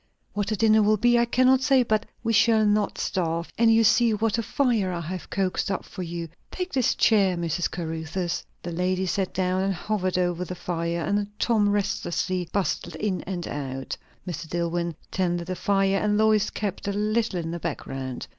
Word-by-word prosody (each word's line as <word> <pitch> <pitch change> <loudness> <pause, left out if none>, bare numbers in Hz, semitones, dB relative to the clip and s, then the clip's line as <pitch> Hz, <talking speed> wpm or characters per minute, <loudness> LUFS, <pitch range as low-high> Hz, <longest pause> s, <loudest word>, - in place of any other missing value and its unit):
What 205 -1 -1
the 215 - 0
dinner 220 0 +4
will 215 +1 +4
be, 240 +2 +4
I 235 - +4
cannot 255 +2 +4
say; 265 -2 +4
but 215 -2 0 0.2
we 230 -1 +1
shall 220 0 +4
not 210 0 +1
starve; 170 -2 -2
and 230 0 +4
you 225 0 +5
see 230 0 +4
what 225 +1 0
a - - +2
fire 230 -5 +1
I 175 - -3
have 180 +2 -6
coaxed 190 0 -1
up 195 - -2
for - - -8
you. 170 -1 -4 0.2
Take 365 0 -5
this 260 -3 +2
chair, 195 -5 +3
Mrs. 170 +1 -1
Caruthers." 165 +1 -3 0.2
The 175 - -4
lady 185 +2 0
sat 190 +1 -1
down 185 0 0
and 195 0 0
hovered 185 -1 -1
over 175 -1 0
the 180 0 -6
fire; 170 -1 -2
and 205 +3 0
Tom 215 -4 +2
restlessly 185 -3 -1
bustled 185 -3 -1
in 200 -4 -1
and 180 -3 -4
out. 135 -2 -4 0.3
Mr. 165 -2 -5
DilIwyn 170 0 -1 0.2
tended 175 -2 0
the 185 +1 -3
fire, 195 0 +2
and 210 0 +1
Lois 215 -1 +3
kept 200 -1 -4
a 200 - 0
little 215 -1 0
in 165 -1 -4
the 170 - -4
background. 135 -6 -5
190 Hz, 195 wpm, -25 LUFS, 175-215 Hz, 0.3 s, you